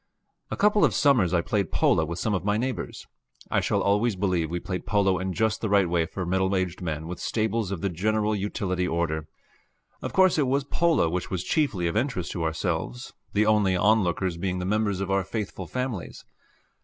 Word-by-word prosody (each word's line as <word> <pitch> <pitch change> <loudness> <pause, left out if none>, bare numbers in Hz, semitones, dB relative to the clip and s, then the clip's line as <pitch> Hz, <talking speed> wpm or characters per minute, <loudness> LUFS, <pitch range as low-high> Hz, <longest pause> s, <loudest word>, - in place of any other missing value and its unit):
A - - -4
couple 210 0 +4
of - - +3
summers 125 - +4
I 90 -2 +2
played 100 0 -1
polo 80 - +3
with 85 +2 -5
some 105 +3 -1
of 95 - -1
my 105 +1 +1
neighbors. 130 +3 -4 0.5
I - - +2
shall - - 0
always 105 +2 +2
believe 90 -4 0
we 85 +1 -2
played 90 +1 -5
polo 100 -3 +2
in 95 0 -2
just 110 +3 0
the 110 - -1
right 100 -2 +4
way 85 -1 +1
for 95 +1 -5
middle 95 +2 +1
aged 95 -1 -2
men 80 -3 -3
with 90 +2 -6
stables 110 -2 -1
of 100 -4 -4
the 100 - 0
general 105 +4 0
utility 95 -2 -2
order. 80 -2 -1 0.7
Of - - -4
course 185 -4 +4
it 140 - +2
was 135 +2 +1
polo 160 - +2
which 90 +2 -3
was 90 -2 -2
chiefly 110 - 0
of 85 - -1
interest 110 -7 -1
to 85 - -3
ourselves, 80 -6 -3 0.2
the 105 +1 +3
only 105 -3 +3
onlookers 95 -3 +2
being 90 +1 -2
the 90 - -3
members 105 -1 0
of 100 0 -2
our 95 0 +2
faithful 95 -2 -5
families. 125 -7 -4
95 Hz, 205 wpm, -26 LUFS, 90-110 Hz, 0.7 s, couple